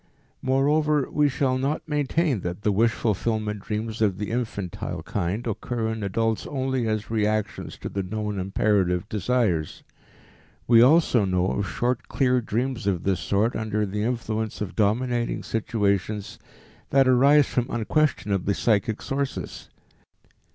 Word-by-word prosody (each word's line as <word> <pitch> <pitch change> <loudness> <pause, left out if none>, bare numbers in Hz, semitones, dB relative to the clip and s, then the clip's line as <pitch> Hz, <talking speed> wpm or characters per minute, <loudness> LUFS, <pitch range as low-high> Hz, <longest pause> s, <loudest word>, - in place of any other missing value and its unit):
Moreover 145 +2 +2
we 150 -1 +3
shall 130 -1 0
not 140 +5 -2
maintain 150 - 0
that 90 +2 -5
the 105 - +2
wish 115 +4 +3
fulfillment 110 -1 -1
dreams 110 +2 -4
of 100 -4 +2
the 105 +1 -4
infantile 110 -6 -4
kind 100 +5 -2
occur 115 0 -2
in 110 -1 -4
adults 110 +3 -1
only 130 -3 -1
as 110 0 -2
reactions 110 -1 -1
to - - -6
the 100 - -3
known 105 +1 -3
imperative 95 -1 +1
desires. 105 -7 0 0.8
We 115 -1 +6
also 130 -3 +5
know 90 -1 +1
of 100 -1 -2
short 125 0 -1
clear 125 -2 +2
dreams 120 0 -2
of 90 -4 0
this 95 -2 +1
sort 105 +4 0
under 110 -1 -1
the 105 +1 -3
influence 110 -2 -2
of 105 -3 -5
dominating 120 +3 0
situations 105 -2 -1 0.5
that 135 -1 +4
arise 140 +3 +6
from 125 0 -1
unquestionably 105 - 0
psychic 110 -1 +1
sources. 140 0 -4
110 Hz, 135 wpm, -25 LUFS, 100-125 Hz, 0.8 s, We